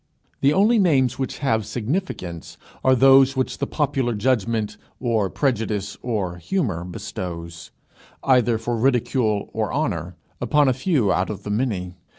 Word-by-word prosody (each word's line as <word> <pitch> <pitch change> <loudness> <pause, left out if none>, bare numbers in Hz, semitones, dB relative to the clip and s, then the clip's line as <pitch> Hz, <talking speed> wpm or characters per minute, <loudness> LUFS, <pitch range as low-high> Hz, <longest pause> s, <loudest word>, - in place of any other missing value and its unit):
The 140 - +4
only 215 +7 +4
names 135 - +2
which 130 - -3
have 110 -4 +2
significance 110 - -4 0.3
are 130 0 +5
those 135 +1 +6
which 130 - -1
the - - -1
popular 135 -5 0
judgment 110 -2 0 0.2
or 115 -6 0
prejudice 105 -7 -1
or 100 -8 -2
humour 105 - -2
bestows, 85 -1 -7 0.5
either 120 -3 +3
for 115 +2 -2
ridicule 120 -3 +1
or 110 -1 -1
honour, 90 - -2 0.3
upon 150 -1 +3
a 130 - +4
few 130 - +1
out 95 - 0
of 100 -2 -6
the 105 - -4
many. 105 -6 -1
115 Hz, 145 wpm, -22 LUFS, 100-135 Hz, 0.5 s, those